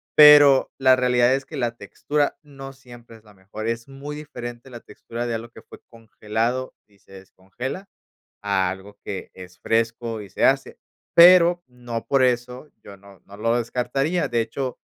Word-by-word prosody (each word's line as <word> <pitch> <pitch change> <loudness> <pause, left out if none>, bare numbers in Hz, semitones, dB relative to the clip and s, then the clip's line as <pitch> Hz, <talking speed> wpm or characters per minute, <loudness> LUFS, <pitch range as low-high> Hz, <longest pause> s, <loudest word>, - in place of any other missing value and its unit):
pero, 145 -3 +7
la 130 -1 +5
realidad 125 0 +2
es 135 0 -2
que 155 - -10
la 120 -2 -2
textura 145 +3 -2
no 135 -2 -11
siempre 120 -3 -15
es 110 - -19
la 105 -1 -19
mejor. 100 +3 -9
Es 115 +2 -4
muy 140 +2 -8
diferente 120 -4 -9
la 120 -2 -11
textura 120 +1 -8
de 120 - -3
algo 115 +1 -6
que - - -15
fue - - -15
congelado 115 +2 -4
y 100 -2 -29
se - - -21
descongela, 95 - -8 0.6
a 95 -2 0
algo 100 +2 -10
que 95 - -7
es 90 0 -13
fresco 115 -1 -2
y 100 - -13
se - - -2
hace, - - +1 0.4
pero, 175 0 +7
no 120 -2 -7
por 135 -2 +2
eso 125 +3 -2
yo 100 -1 -13
no 100 0 -18
no 100 - -13
lo 115 +3 0
descartaría. 135 +7 -2
De 120 -2 0
hecho, 125 +3 -4
120 Hz, 175 wpm, -22 LUFS, 110-135 Hz, 0.6 s, pero